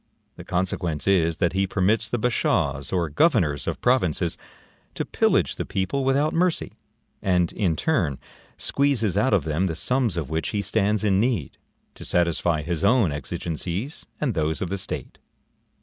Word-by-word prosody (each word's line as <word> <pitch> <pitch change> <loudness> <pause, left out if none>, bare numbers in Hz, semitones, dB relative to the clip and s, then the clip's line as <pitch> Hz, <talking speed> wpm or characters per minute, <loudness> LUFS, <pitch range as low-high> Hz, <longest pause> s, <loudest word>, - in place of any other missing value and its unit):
The - - -10
consequence 90 -3 -2
is 85 -4 +3
that 85 -1 +1
he 95 0 +1
permits 105 +3 +1
the 120 - 0
bashaws 105 - 0
or 90 -3 +1
governors 75 - +2
of - - -2
provinces 90 - +1 0.6
to - - -2
pillage - - +1
the - - -2
people 115 +9 -2
without 140 +3 +2
mercy; 180 0 +1 0.5
and, 90 -3 +1
in 90 -7 0
turn, 85 - 0 0.4
squeezes 130 -9 +1
out 105 +6 +2
of 100 -7 +3
them 80 +4 0
the 80 - -3
sums 120 +1 0
of 80 -5 -2
which 80 0 -1
he 105 - -1
stands 105 +2 +1
in 100 -2 +3
need, 110 - -1 0.3
to - - -11
satisfy 85 -2 +1
his 85 +1 -3
own 105 - +4
exigencies 85 - -4
and 135 -6 0
those 80 -2 0
of 95 - -3
the 100 +1 -2
state. 95 - -5
95 Hz, 165 wpm, -24 LUFS, 80-115 Hz, 0.6 s, own